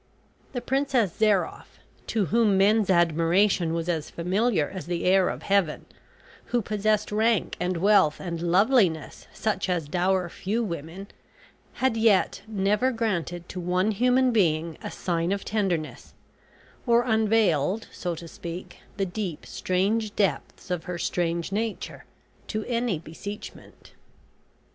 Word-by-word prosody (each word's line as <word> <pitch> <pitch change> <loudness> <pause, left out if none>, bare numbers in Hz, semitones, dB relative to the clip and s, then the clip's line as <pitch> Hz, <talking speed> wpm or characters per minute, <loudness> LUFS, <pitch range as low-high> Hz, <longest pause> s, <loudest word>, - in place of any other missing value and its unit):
The 245 - -3
Princess 265 -7 +1
Zairoff, 210 -4 0 0.3
to 215 -4 0
whom 220 -4 +4
men's 205 +1 +3
admiration 170 +1 +3
was 165 0 -2
as 165 -4 -2
familiar 180 -1 0
as 185 -5 -8
the 175 -1 -2
air 185 0 +4
of - - -6
Heaven, 195 -6 +1 0.6
who 240 -2 0
possessed 210 +1 0
rank 220 -1 +1
and 180 0 -1
wealth 190 -5 +4
and 170 -2 -5
loveliness 180 - +2
such 205 -3 -2
as 170 -5 -1
dower 185 +2 +1
few 210 +7 -2
women, 170 0 -6 0.7
had 260 -3 0
yet 220 -3 +3
never 210 +4 +1
granted 175 -7 -2
to 185 - -6
one 180 +4 +1
human 250 +4 +3
being 165 -6 +1
a - - -5
sign 170 0 -2
of 200 0 -2
tenderness, 190 -7 -2 0.7
or 235 0 +4
unveiled, 220 - +2
so 175 -2 -4
to 170 +1 -9
speak, 170 +2 -8 0.2
the 195 - +1
deep 180 -3 -5
strange 205 +4 -1
depths 195 -2 -1
of 175 -2 -2
her 180 -1 -4
strange 170 0 -1
nature, 220 +2 -4 0.4
to 215 -1 -3
any 235 -6 0
beseechment. 170 +6 -10
195 Hz, 135 wpm, -26 LUFS, 170-220 Hz, 0.7 s, whom